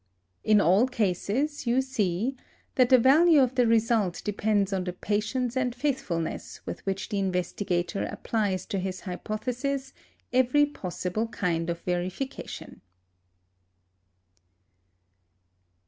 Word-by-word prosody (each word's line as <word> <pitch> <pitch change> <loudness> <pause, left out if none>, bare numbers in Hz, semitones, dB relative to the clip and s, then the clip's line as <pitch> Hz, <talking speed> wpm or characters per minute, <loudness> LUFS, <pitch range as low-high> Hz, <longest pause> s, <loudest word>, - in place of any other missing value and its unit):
In 215 -1 +5
all 200 +7 +4
cases, 245 - -1
you 240 +2 +3
see 230 -2 -1 0.4
that 255 -4 +4
the 260 - +8
value 300 +6 +6
of 260 -2 +3
the 250 -2 +3
result 225 -5 +2
depends 205 -1 +1
on 190 -1 0
the 180 - -3
patience 215 +6 -1
and 250 -2 0
faithfulness 195 - -2
with - - -6
which 195 0 -2
the 205 -2 -1
investigator 180 0 -1
applies 205 -5 -1
to 195 - -2
his 185 0 -4
hypothesis 250 +8 -3 0.4
every 260 +3 +4
possible 195 -4 -3
kind 170 -6 -1
of 170 0 -3
verification. 180 +9 -4
215 Hz, 115 wpm, -27 LUFS, 185-255 Hz, 0.4 s, the